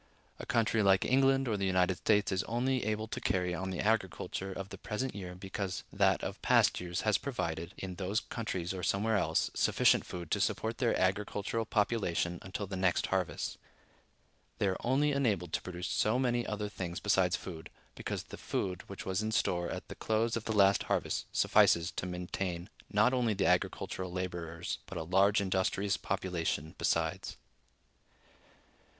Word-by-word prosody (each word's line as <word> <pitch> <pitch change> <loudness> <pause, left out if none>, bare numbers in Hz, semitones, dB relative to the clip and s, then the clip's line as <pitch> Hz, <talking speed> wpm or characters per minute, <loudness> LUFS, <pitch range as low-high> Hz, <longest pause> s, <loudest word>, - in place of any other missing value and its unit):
A - - -7
country 115 -1 +2
like 95 -2 +4
England 135 +1 +3
or 110 -3 0
the 100 -1 0
United 90 0 +2
States 105 0 +2
is 95 -1 +1
only 125 +1 0
able 110 +1 -1
to - - -5
carry 90 -1 0
on 95 +2 -3
the 90 - -4
agriculture 95 -2 -1
of 95 +1 -6
the - - -9
present 130 +5 -3
year 90 -3 -6
because 95 +1 -4
that - - +3
of - - -5
past - - +4
years 90 +1 -3
has 105 -1 +2
provided, 85 - -3
in 95 -1 -5
those 100 +3 0
countries 95 -8 -4
or 95 - -5
somewhere 105 +5 +1
else, 100 - +1
sufficient - - +4
food 85 -3 -7
to - - +1
support 115 +2 -1
their 120 -3 +2
agricultural 105 +4 0
population 100 -6 0
until 95 +2 -4
the 95 0 -5
next 95 -1 +2
harvest. 95 -3 -1 1.0
They - - +1
are 95 - -1
only 140 +4 +3
enabled 105 - 0
to - - 0
produce 90 0 -5
so 110 +3 +2
many 120 -2 +1
other 105 0 -2
things 90 -4 -5
besides 95 -3 +3
food, 80 -4 -7 0.2
because - - -4
the - - -10
food 90 -2 -2
which 100 - -7
was 95 +1 0
in 110 0 -2
store 85 -5 +1
at - - -5
the - - -7
close 110 +1 0
of 115 - -3
the - - -2
last 100 0 +5
harvest - - 0
suffices 85 0 +4
to 90 - -2
maintain 90 +1 -4 0.2
not 105 +5 +3
only 120 -4 +1
the 95 - +1
agricultural 95 -1 0
laborers, 90 -2 -4
but - - -6
a - - -2
large 95 +5 +4
industrious 95 +1 +1
population 85 -5 -2
besides. - - 0
95 Hz, 175 wpm, -32 LUFS, 90-110 Hz, 1.0 s, last